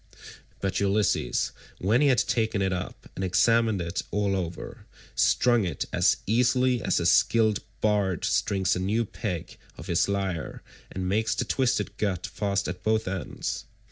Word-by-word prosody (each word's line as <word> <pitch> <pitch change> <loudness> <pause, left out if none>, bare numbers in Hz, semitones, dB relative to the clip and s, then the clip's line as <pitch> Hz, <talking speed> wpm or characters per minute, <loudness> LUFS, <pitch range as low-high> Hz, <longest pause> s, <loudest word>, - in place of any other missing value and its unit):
But 95 -1 -1
Ulysses, 100 - +1 0.3
when 110 +8 +2
he 145 - +4
had 130 -3 +4
taken 110 -4 +1
it 95 -1 0
up 90 0 -6
and 95 - -4
examined 110 +3 +3
it 85 +2 -3
all 100 -1 0
over, 85 -3 -6 0.3
strung 120 -3 +3
it 85 -7 -2
as - - +3
easily 125 +2 +2
as - - +1
a 85 - -2
skilled 110 +4 +4 0.2
bard 100 -5 +1
strings 95 -2 +1
a - - -2
new 105 +5 0
peg 95 -5 -5 0.2
of - - -9
his 85 +3 +1
lyre 95 -5 -3 0.3
and 90 0 -3
makes 110 +4 +1
the - - -1
twisted 105 -7 0
gut 95 -4 -1
fast 100 -1 -2
at - - -5
both 110 -1 +1
ends. 95 -1 -4
100 Hz, 160 wpm, -27 LUFS, 95-110 Hz, 0.3 s, he